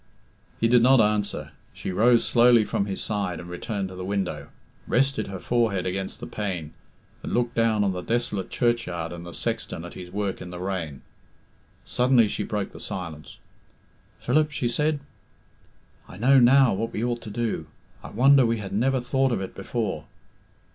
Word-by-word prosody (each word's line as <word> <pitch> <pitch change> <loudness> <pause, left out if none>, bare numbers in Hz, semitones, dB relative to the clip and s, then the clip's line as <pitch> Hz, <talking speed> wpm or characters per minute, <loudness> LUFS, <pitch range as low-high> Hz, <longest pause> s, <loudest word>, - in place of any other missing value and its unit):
_" - - -37 0.6
He 115 - +3
did 120 0 +5
not 130 +2 +6
answer. 105 -1 0 0.2
She - - -5
rose 115 +5 +4
slowly 120 -2 +5
from 100 - -1
his 95 - -3
side 100 -6 -2
and 85 - -9
returned 95 +2 -4
to 95 - -9
the 90 - -6
window, 95 -1 -2 0.4
rested 135 -4 +1
her 95 - -5
forehead 110 -4 0
against 95 +1 -3
the - - -6
pane, 90 -7 -4 0.5
and - - -3
looked 120 0 0
down 115 -3 +2
on 100 - +1
the 90 -1 -4
desolate 105 -2 -1
churchyard 90 -9 -1
and 85 0 -8
the - - -7
sexton 85 0 -3
at 85 - -9
his 90 -1 -9
work 100 0 -3
in 90 - -7
the 90 0 -7
rain. 90 -7 -4 0.8
Suddenly 125 -2 +3
she - - -3
broke 105 -2 -3
the - - -11
silence. 80 -5 -6 0.8
"Philip," 155 0 +2
she 125 -4 -2
said, 150 +5 0 1.1
"I - - -11
know 135 +6 +5
now 130 +1 +6
what 115 +4 -3
we 110 - -2
ought 120 -1 -1
to 110 - -8
do. 105 -7 -2 0.4
I - - -8
wonder 135 +4 +5
we 115 -1 +1
have 100 -3 -6
never 130 +6 +2
thought 135 +1 +1
of 115 - 0
it 95 - -5
before." - - -3
105 Hz, 180 wpm, -25 LUFS, 95-120 Hz, 1.1 s, not